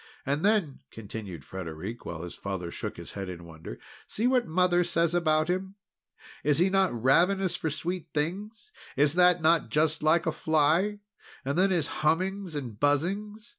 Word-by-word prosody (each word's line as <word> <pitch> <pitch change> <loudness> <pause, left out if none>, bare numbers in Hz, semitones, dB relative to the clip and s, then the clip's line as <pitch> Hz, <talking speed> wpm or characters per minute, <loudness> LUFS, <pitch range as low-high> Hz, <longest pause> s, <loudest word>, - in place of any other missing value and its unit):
And 145 +4 -1
then," 200 -9 +1
continued 100 -8 -8
Frederic, 95 +5 -7
while 85 -1 -5
his 90 - -7
father 95 -3 -5
shook - - -5
his - - -9
head 100 -2 -6
in 85 -1 -8
wonder, 80 -7 -9 0.3
"see 220 - -2
what 250 -1 +2
Mother 180 +1 +3
says 170 -1 +1
about 155 -2 +2
him. 190 +2 -2 0.7
Is 145 0 +2
he 180 +3 +3
not 195 -1 +3
ravenous 175 - +2
for 160 - -2
sweet 165 +4 -4
things? 205 - -4 0.3
Is 145 +1 +3
that 180 -1 +4
not 165 +1 +3
just 155 +1 +1
like 160 +2 +3
a 165 - +1
fly? 160 +7 +1 0.4
And 140 +1 -1
then 190 +2 +3
his 175 -5 +1 0.2
hummings 185 +3 0
and 120 -7 -5
buzzings." 200 +10 0
160 Hz, 170 wpm, -28 LUFS, 135-185 Hz, 0.7 s, that